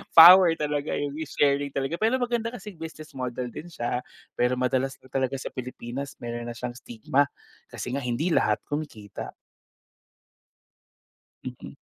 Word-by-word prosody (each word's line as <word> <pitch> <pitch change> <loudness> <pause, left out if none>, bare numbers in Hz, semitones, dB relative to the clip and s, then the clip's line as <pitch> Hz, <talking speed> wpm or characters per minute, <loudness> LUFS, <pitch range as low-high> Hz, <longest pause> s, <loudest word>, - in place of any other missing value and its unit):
power 175 +1 +10
talaga 150 -1 -1
yung 145 -1 -2
may 155 +2 -5
sharing 140 0 +2
talaga 140 +5 -1
pero 225 +4 +3
maganda 240 -2 0
kasi 205 -6 -9
business 155 -1 -8
model 125 -2 -4
din 165 - -8
siya 125 -6 -2 0.4
pero 125 +1 +3
madalas 130 +1 0
lang 130 - -18
talaga 135 0 0
sa 130 - -5
Pilipinas 130 +1 -6
meron 120 0 -4
na 120 - -5
siyang 120 +1 -5
stigma 130 +5 +1 0.4
kasi 125 - -6
nga 140 - -1
hindi 130 +7 -1
lahat 105 -9 +2
kumikita. 115 -9 -5 2.1
Mhm. - - -8
140 Hz, 145 wpm, -26 LUFS, 125-160 Hz, 2.1 s, power